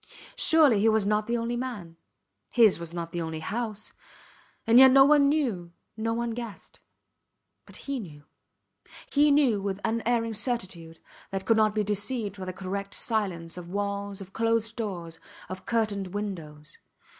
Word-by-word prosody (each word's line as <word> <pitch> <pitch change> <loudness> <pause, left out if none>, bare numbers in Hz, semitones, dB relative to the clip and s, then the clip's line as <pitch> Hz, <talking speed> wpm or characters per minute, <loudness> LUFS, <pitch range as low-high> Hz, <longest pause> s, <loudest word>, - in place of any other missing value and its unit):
Surely 300 -10 +5
he 220 +2 +4
was 220 -2 +2
not 210 +1 +1
the 235 0 0
only 230 +1 -2
man; 230 -10 -5 0.5
his 220 -7 +4
was 170 -1 -6
not 170 -1 -5
the 175 - -3
only 160 -1 -4
house... 215 +4 -4 0.7
and 230 +2 +6
yet 265 0 +10
no 270 +1 +7
one 285 -1 +5
knew 225 - -1 0.2
no 225 +1 -2
one 235 +1 -2
guessed. 230 -4 -8 0.9
But - - -14
he 275 -2 -2
knew. 150 -9 -10 0.9
He 295 +1 +4
knew 275 -8 +3
with 195 0 -3
unerring 230 0 0
certitude 190 -8 -3 0.3
that 195 0 -4
could 225 - +3
not 215 -1 +3
be 215 - +1
deceived 205 0 -2
by 185 - -5
the 185 - -4
correct 195 +2 -5
silence 180 -7 -2
of 175 -1 -8
walls, 200 0 -3
of 190 0 -11
closed 225 -1 0
doors, 175 -8 -5 0.3
of 185 0 -8
curtained 205 -4 -1
windows. 160 -8 -6
210 Hz, 160 wpm, -27 LUFS, 185-235 Hz, 0.9 s, yet